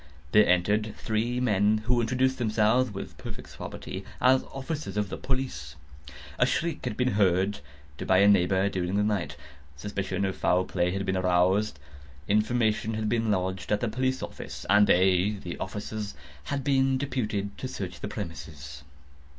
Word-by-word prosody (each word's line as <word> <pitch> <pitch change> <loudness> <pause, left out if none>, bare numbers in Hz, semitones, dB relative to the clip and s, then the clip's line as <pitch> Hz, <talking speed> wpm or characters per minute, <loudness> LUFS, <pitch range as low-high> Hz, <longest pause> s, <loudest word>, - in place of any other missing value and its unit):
There 105 0 +6
entered 105 +5 +2
three 115 +3 -1
men, 105 -2 +2
who 120 0 +3
introduced 130 +3 +1
themselves, 110 +2 +2
with 100 -2 -7
perfect - - -8
suavity, 95 +1 -7 0.2
as 130 +1 +4
officers 140 -2 -5
of 105 -2 0
the - - -5
police. 125 - -3 0.6
A - - +5
shriek 165 -2 -1
had 105 - -3
been 125 0 +2
heard 100 -2 +2 0.5
by 95 - +5
a 100 +2 +6
neighbour 95 -1 +4
during 95 -1 -2
the 105 - +2
night; 105 -4 -1 0.4
suspicion 100 +3 -3
of 95 - -2
foul 90 +1 +2
play 90 -1 0
had 100 +2 -2
been 95 0 0
aroused; 90 0 +2 0.5
information 110 +1 +1
had 110 -1 -1
been 115 -1 +1
lodged 95 -2 -1
at 105 - +3
the 120 - -1
police 130 +3 -1
office, - - -7
and 105 0 +6
they 95 +3 +3
(the 85 - -5
officers) 105 0 -5 0.3
had 140 -1 -2
been 135 -1 +2
deputed 110 -7 -2
to - - -3
search - - -6
the - - -4
premises. 75 -4 -7
105 Hz, 160 wpm, -27 LUFS, 95-120 Hz, 0.6 s, There